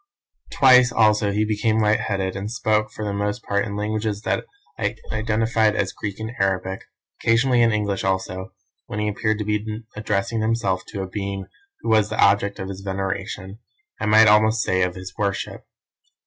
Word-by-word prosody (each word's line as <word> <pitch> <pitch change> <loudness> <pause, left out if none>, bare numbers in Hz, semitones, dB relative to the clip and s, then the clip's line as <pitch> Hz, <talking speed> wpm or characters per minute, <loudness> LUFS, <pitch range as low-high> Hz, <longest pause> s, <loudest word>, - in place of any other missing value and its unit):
Twice 125 -2 +6
also 105 -2 +3
he 105 +2 +1
became 110 +1 +1
light 110 0 +3
headed, 95 -2 -2
and 100 +2 -4
spoke, 110 -2 0
for 110 - -6
the 100 - -2
most 105 +3 -2
part 100 0 0
in 100 -2 -5
languages 105 0 -2
that - - -1 0.3
I - - -1 0.2
identified 110 0 +1
as 100 -3 -1
Greek 100 -1 -5
and 110 +1 -4
Arabic; 95 0 0 0.4
occasionally 120 +2 +3
in 115 -1 +4
English 105 -2 -1
also, 95 -1 -2 0.4
when - - -5
he 105 0 0
appeared 110 +1 0
to 105 - -3
be 105 +1 -2
addressing 110 +1 -1
himself 110 -4 0
to 95 - -5
a - - -5
being 100 0 -4 0.4
who - - -3
was 110 -1 +4
the - - -4
object 100 0 +3
of 95 - -5
his 95 0 -7
veneration, 95 +1 -4 0.4
I - - -2
might 110 +1 +7
almost 110 +2 +4
say 95 0 +1
of 90 -1 0
his 95 0 -8
worship. 100 -2 -3
105 Hz, 180 wpm, -22 LUFS, 100-110 Hz, 0.4 s, might